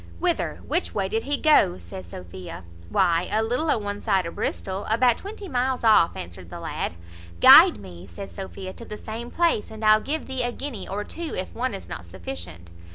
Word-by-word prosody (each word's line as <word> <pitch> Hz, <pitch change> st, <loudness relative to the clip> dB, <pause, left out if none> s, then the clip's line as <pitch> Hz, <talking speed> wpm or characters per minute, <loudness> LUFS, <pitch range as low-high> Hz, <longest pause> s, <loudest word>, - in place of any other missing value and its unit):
"Whither? -, -, -1 dB
which 85 Hz, 0 st, -1 dB
way 190 Hz, -, 0 dB
did 225 Hz, -, 0 dB
he 290 Hz, -, +2 dB
go?" 300 Hz, -, +4 dB
says 85 Hz, 0 st, -9 dB
Sophia. 90 Hz, 0 st, -9 dB, 0.3 s
"Why, 170 Hz, -, +2 dB
a 215 Hz, +1 st, +2 dB
little 250 Hz, +8 st, 0 dB
o' -, -, +3 dB
one 205 Hz, -1 st, -4 dB
side 195 Hz, -5 st, +1 dB
o' 170 Hz, -, -4 dB
Bristol, 190 Hz, +3 st, -3 dB
about 235 Hz, +2 st, +3 dB
twenty 405 Hz, 0 st, -8 dB
miles 255 Hz, -3 st, -1 dB
off," 215 Hz, -7 st, +5 dB
answered 85 Hz, 0 st, -8 dB
the -, -, -7 dB
lad. -, -, -3 dB, 0.4 s
"Guide -, -, +9 dB
me," 90 Hz, -2 st, -11 dB
says 195 Hz, -, -8 dB
Sophia, 190 Hz, -1 st, -7 dB
"to 235 Hz, -, -11 dB
the 210 Hz, -, -7 dB
same 230 Hz, +3 st, -6 dB
place, 335 Hz, -9 st, +1 dB
and 220 Hz, 0 st, -6 dB
I'll 215 Hz, 0 st, +6 dB
give 310 Hz, +5 st, -3 dB
thee 265 Hz, -1 st, -3 dB
a 245 Hz, 0 st, 0 dB
guinea, 245 Hz, -5 st, -6 dB
or 205 Hz, +2 st, -3 dB
two, 330 Hz, +7 st, -6 dB
if 185 Hz, -, -4 dB
one 250 Hz, -2 st, -2 dB
is 195 Hz, -, -9 dB
not -, -, -6 dB
sufficient." 85 Hz, -1 st, -8 dB
205 Hz, 205 wpm, -25 LUFS, -, 0.4 s, Guide